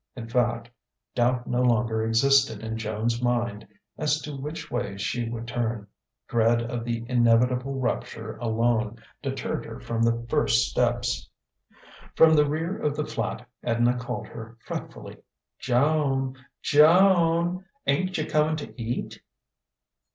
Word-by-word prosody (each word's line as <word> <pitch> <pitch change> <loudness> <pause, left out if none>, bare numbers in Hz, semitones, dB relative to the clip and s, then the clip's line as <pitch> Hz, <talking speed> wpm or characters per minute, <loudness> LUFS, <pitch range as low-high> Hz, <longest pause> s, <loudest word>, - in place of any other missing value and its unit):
In 115 - -7
fact, 120 -1 0 0.5
doubt 125 0 +1
no 125 0 0
longer 115 -2 +2
existed 115 0 +3
in 110 0 -3
Joan's 110 +2 -2
mind 120 -4 -1 0.3
as 150 0 +1
to 150 -1 -6
which 150 +4 -6
way 120 -5 -3
she 115 +4 -2
would 115 0 -5
turn: 115 -3 -2 0.4
dread 115 0 +3
of 120 0 -4
the 115 -1 -3
inevitable 125 +2 +2
rupture 125 - -3
alone 115 -1 0 0.2
deterred 135 -2 -3
her - - -8
from 115 -1 -3
the 115 0 +1
first - - +2
steps. - - 0 0.9
From 160 0 +7
the 150 -2 +4
rear 165 +5 -2
of 150 -1 -1
the 150 0 -2
flat 125 - -4 0.2
Edna 120 +1 +2
called 125 0 -4
her 115 0 -10
fretfully: - - -7 0.4
"Joan! 135 0 +1 0.3
Jo 165 +7 +6 0.3
an! 180 +2 -2 0.2
Ain't 185 +7 +1
you 155 - -1
coming 155 0 +2
to 145 -5 -8
eat?" 115 +2 -4
120 Hz, 135 wpm, -26 LUFS, 115-140 Hz, 0.9 s, From